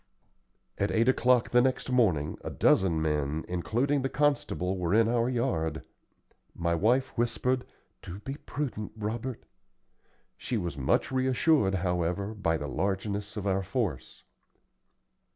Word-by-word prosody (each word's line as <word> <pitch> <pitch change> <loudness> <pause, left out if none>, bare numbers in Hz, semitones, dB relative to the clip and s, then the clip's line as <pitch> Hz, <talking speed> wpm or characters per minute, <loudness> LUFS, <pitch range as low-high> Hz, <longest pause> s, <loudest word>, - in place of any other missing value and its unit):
At 100 - +1
eight 115 +2 +2
o'clock 125 -2 +3
the 120 - +5
next 130 0 0
morning, 90 - +2
a - - -4
dozen 85 -4 +3
men, 75 0 -1
including 120 +11 0
the 135 - -1
constable, 140 -11 0
were 90 +2 +1
in 115 0 +5
our 120 +1 +1
yard. 120 - -1 0.7
My 85 0 0
wife 120 +10 +2
whispered, 125 +2 0 0.4
"Do 90 - -8
be 135 +7 -6
prudent, 130 -9 -5
Robert." 110 +3 -4 0.9
She 120 - -3
was 85 -7 -3
much 70 - +1
reassured, 130 -4 +2
however, 90 +3 -1
by 85 -6 0
the 75 - -5
largeness 100 +5 -2
of 100 - -4
our 95 -1 +1
force. 100 - -3
105 Hz, 135 wpm, -29 LUFS, 90-125 Hz, 0.9 s, the